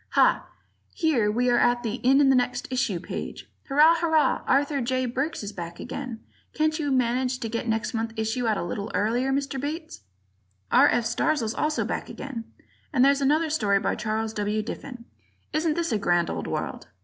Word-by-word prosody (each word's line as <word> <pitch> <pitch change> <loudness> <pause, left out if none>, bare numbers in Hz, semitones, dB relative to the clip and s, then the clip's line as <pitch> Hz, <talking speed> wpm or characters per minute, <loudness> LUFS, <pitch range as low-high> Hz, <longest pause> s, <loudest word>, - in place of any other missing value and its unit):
Ha! - - +3 0.5
Here 280 -11 +2
we 245 +3 +1
are 240 - +4
at 240 0 +2
the 225 0 -2
"In 270 +3 +5
the 270 - +5
Next 250 0 0
Issue" 215 -8 0
page. - - -6 0.2
Hurrah! 300 +4 +6
Hurrah! 320 -2 +2
Arthur 280 +1 +2
J. 255 +1 0
Burks 265 +3 -2
is 205 0 -6
back 170 -2 -7
again! 250 -5 -6 0.3
Can't 310 +1 +1
you 290 -2 -1
manage 255 0 +1
to 230 - -3
get 230 +2 -3
next 225 +2 -1
month's 225 0 -3
issue 220 +2 -1
out 215 -2 +2
a - - -2
little 200 +5 -4
earlier, 240 +5 +1
Mr. 275 -1 -1
Bates? 310 - -5 0.7
R. - - +7
F. 240 -1 +1
Starzl's 230 -4 0
also 305 +5 0
back - - -4
again; 240 -5 -6 0.5
and 265 -4 +4
there's 280 0 +4
to 275 - 0
be - - +4
another 310 +2 +2
story 205 -10 +2
by - - 0
Charles 220 0 -2
W. 210 0 -1
Diffin. 245 +1 -8 0.5
Isn't 310 0 +1
this 335 -3 -1
a 215 - +1
grand 175 -3 +1
old - - -4
world? - - -4
250 Hz, 195 wpm, -26 LUFS, 220-280 Hz, 0.7 s, R